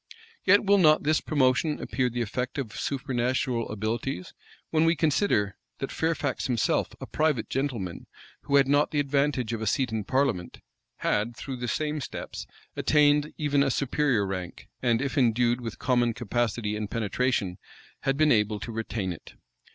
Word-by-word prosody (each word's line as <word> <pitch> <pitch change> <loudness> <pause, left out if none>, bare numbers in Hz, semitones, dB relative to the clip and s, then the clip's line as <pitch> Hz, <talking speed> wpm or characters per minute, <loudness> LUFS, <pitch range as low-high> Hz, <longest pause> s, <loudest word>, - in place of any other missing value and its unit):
Yet 200 +2 +5
will 200 0 +5
not 155 -3 +5
this 155 +1 +2
promotion 145 +1 +1
appear 130 -2 -1
the 120 0 -2
effect 125 +4 -3
of 115 -5 -4
supernatural 125 -2 -1
abilities, 110 0 -3 0.4
when 155 0 +3
we 165 +1 +4
consider, 145 - +1 0.2
that 135 - -4
Fairfax 160 -4 -1
himself, 120 -4 +1
a - - -6
private 150 -7 0
gentleman, 120 -11 -3 0.4
who 140 - +1
had 140 -1 +5
not 145 +2 +3
the 150 - -1
advantage 140 -4 0
of 115 - -3
a 110 - -2
seat 125 +3 +1
in 110 -1 -2
parliament, 125 -8 -1 0.4
had, 115 +3 -1
through 135 0 -5
the 125 0 -4
same 150 +5 -1
steps, - - -6 0.3
attained 150 0 +3
even 145 -2 +2
a 140 - +3
superior 135 -4 +1
rank, 95 -2 -6
and, 120 0 +2
if 140 +1 -1
endued 120 0 +2
with 115 -2 -6
common 120 -3 +1
capacity 115 -2 -1
and 105 -1 -4
penetration, 110 -4 -1 0.4
had 135 0 0
been 155 0 +4
able 105 -1 +2
to 115 - -6
retain 110 -4 -3
it. 80 - -14
125 Hz, 165 wpm, -27 LUFS, 110-145 Hz, 0.4 s, Yet